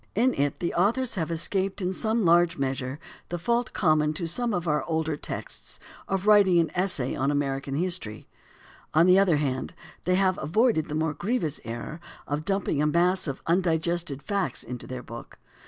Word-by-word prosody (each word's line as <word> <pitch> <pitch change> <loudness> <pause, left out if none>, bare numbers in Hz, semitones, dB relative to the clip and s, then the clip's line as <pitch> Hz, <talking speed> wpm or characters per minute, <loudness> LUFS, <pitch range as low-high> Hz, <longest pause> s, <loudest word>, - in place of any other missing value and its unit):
In 245 +5 +3
it 145 0 -1
the 170 - -1
authors 230 +8 +1
have 165 -4 -2
escaped 190 +4 -1
in 185 -1 -1 0.3
large 170 0 +4
measure 130 0 -2 0.3
the 175 - -2
fault 235 +7 0
common 155 -4 +2
to 170 +2 -3
some 235 +9 -1
of 175 -4 -2
our 150 -1 +1
older 160 -2 -1
texts - - -6 0.3
of 195 0 -2
writing 205 -4 +6
an 165 -2 +2
essay 180 -8 +2
on 135 +1 0
American 135 -1 -1
history; 170 - -2 0.7
on 165 +2 +6
the 185 +1 +6
other 185 -6 +4
hand 135 +2 -2 0.3
they 180 - +2
have 185 -1 +2
avoided 195 - +2
the 150 - -3
more 155 0 0
grievous 175 - -2
error 120 +7 -6 0.3
of 145 +2 -3
dumping 195 -7 0
a 150 - +2
mass 175 +3 +2
of 140 - -5
undigested 170 -4 0
facts 200 -2 -1
into 125 -1 -7
their 125 -1 -6
book. 115 +1 -10
170 Hz, 175 wpm, -26 LUFS, 145-190 Hz, 0.7 s, writing